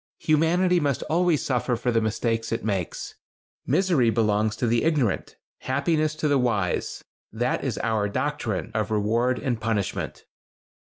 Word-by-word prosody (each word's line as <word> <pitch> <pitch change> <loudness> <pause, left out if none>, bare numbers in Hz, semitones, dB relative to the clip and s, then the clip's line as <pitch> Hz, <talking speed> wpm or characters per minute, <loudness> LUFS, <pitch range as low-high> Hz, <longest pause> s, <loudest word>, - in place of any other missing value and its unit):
Humanity 175 +4 +2
must 140 -5 0
always 170 -2 +2
suffer 125 -1 0
for 125 +1 -1
the 115 -1 +2
mistakes 115 +1 -1
it 115 - -2
makes. 95 -5 -3 0.5
Misery 170 -11 +3
belongs 110 -1 +1
to 120 - -1
the 115 0 +2
ignorant; 145 - 0 0.2
happiness 155 +3 0
to 155 0 -1
the 145 -2 +3
wise. 105 -8 -1 0.3
That 120 +3 -1
is 130 -5 -2
our 110 -3 +1
doctrine 120 -5 -2
of 110 0 -1
reward 115 +4 +1
and 120 -5 -2
punishment." 110 -3 -2
120 Hz, 145 wpm, -25 LUFS, 110-150 Hz, 0.5 s, Misery